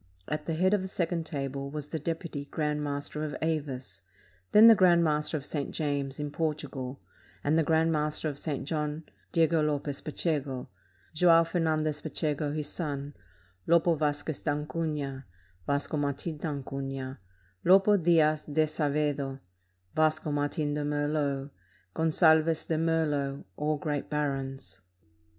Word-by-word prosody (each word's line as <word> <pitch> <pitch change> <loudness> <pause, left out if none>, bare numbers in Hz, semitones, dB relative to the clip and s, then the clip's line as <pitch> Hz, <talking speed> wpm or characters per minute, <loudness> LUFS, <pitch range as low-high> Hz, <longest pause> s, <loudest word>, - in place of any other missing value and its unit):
At 150 0 -3
the 165 - 0
head 185 +4 +3
of 205 - +3
the 190 - -4
second 170 -3 -2
table 140 -2 -3
was 150 0 -6
the 160 - -3
deputy 160 -2 -4
grand 150 0 -2
master 145 +1 -3
of 150 -2 -3
Avis: 145 -9 -3 0.5
then 215 +2 +8
the 230 - +11
grand 180 -4 +5
master 150 0 +1
of 140 - -6
St. 145 -3 -3
James, 140 -3 -2
in 145 -1 -3
Portugal, 145 -4 -3 0.4
and 145 +2 +2
the 165 - +4
grand 160 +1 +2
master 150 0 0
of 145 -2 -4
St. 145 -3 -3
John, 150 0 -2 0.3
Diego 165 -1 +3
Lopez 145 -2 -1
Pacheco, 145 -4 -2 0.4
Joao 165 +1 +6
Fer 165 +2 -2
nandez 155 -2 0
Pacheco 150 -1 -1
his 150 0 -3
son, 145 -3 -4 0.5
Lopo 170 0 +4
Vasquez 150 -1 -1
d'Acunha, 150 -2 -2 0.4
Vasco 145 +2 0
Martin 145 +2 -2
d'Acunha, 135 -3 -4 0.4
Lopo 195 +3 +6
Diaz 160 -4 +4
d'Azevedo, 150 -2 0 0.6
Vasco 155 -1 +1
Martin 145 +1 -1
de 150 - -1
Merlo, 145 -1 -1 0.4
Gonzalves 160 0 +3
de 160 - 0
Meflo, 150 -4 0
all 150 +1 0
great 145 -1 -3
barons. 135 -8 -3
150 Hz, 135 wpm, -29 LUFS, 145-160 Hz, 0.6 s, the